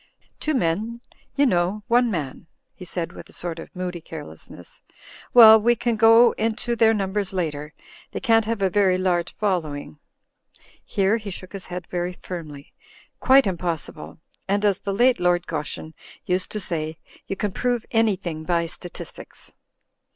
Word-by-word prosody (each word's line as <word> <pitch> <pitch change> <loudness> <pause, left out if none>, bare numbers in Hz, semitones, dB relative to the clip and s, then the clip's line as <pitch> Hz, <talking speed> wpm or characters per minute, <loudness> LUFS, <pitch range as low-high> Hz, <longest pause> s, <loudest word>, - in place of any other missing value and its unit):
"Two 310 -1 -1
men, 220 +3 -1 0.4
you 285 0 +4
know— 190 -1 +1
one 240 +1 +3
man," 155 -7 -4 0.3
he 180 - -11
said 170 -1 -4
with - - -11
a - - -17
sort 170 -1 -5
of 165 - -11
moody 180 -1 -4
carelessness. 150 - -11 0.5
"Well 220 -2 +9
we 240 +2 +3
can 235 0 -1
go 225 +2 +6
into 230 +2 -1
their 225 -1 +5
numbers 200 -2 -1
later; 150 -4 -3 0.4
they - - -4
can't 225 -3 +3
have 225 -2 -2
a 190 - +3
vtry 190 -2 +3
large 175 -2 0
fol 195 -4 0
lowing." 145 - -8 0.8
Here 200 +3 +1
he 210 -3 -7
shook 185 0 -9
his 195 -2 -7
head 180 -1 -6
very 175 +1 -3
firmly. 155 -6 -9 0.5
"Quite 270 0 +6
impossible. 170 -4 -4 0.3
And 200 +2 +1
as 200 -3 +2
the 200 - -3
late 240 +3 +3
Lord 175 -1 +2
Goschen 155 0 -4 0.3
used 185 0 -1
to 210 - -2
say, 160 -4 -3 0.3
'You 195 - -3
can 205 +1 -2
prove 245 +3 -1
anything 190 -8 0
by 170 0 +1
statistics.' 175 +1 -10
190 Hz, 160 wpm, -23 LUFS, 170-220 Hz, 0.8 s, Well